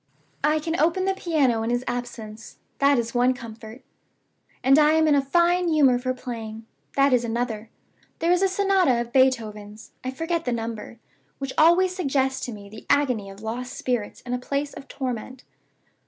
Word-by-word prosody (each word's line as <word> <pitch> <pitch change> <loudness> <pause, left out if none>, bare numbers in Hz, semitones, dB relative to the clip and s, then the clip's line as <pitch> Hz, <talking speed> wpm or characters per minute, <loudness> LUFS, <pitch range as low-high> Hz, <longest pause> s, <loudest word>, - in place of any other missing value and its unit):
"I 305 +1 +3
can 325 +2 -2
open 340 +5 +2
the 385 - +2
piano 295 -11 +1
in 225 - -2
his 245 +1 0
absence 225 -3 -6 0.2
that 280 0 +4
is 235 -1 -2
one 250 +1 +3
comfort. 225 0 -10 0.8
And 270 +3 +6
I 300 0 +5
am 320 0 +3
in 300 - +4
a 285 - +4
fine 345 +5 +2
humor 280 -6 +4
for 255 +1 -1
playing 225 -3 -7 0.3
that 275 -1 +4
is 245 -1 +3
another. 230 -2 -3 0.5
There 335 +1 +1
is 360 +1 +3
a 390 - +4
sonata 380 -9 +2
of 235 0 -5
Beethoven's 220 -5 0
(I 255 - -2
forget 325 +5 -2
the 245 - -1
number), 230 0 -5 0.4
which 275 -1 -5
always 355 +3 +4
suggests 265 -6 0
to - - -5
me 205 -2 -10
the 215 +2 -12
agony 250 -9 +2
of 195 +2 -12
lost 245 +3 -4
spirits 245 -5 -3
in 245 - -5
a 250 - -1
place 280 +3 -3
of 275 - -10
torment. 255 -1 -5
255 Hz, 185 wpm, -24 LUFS, 230-305 Hz, 0.8 s, And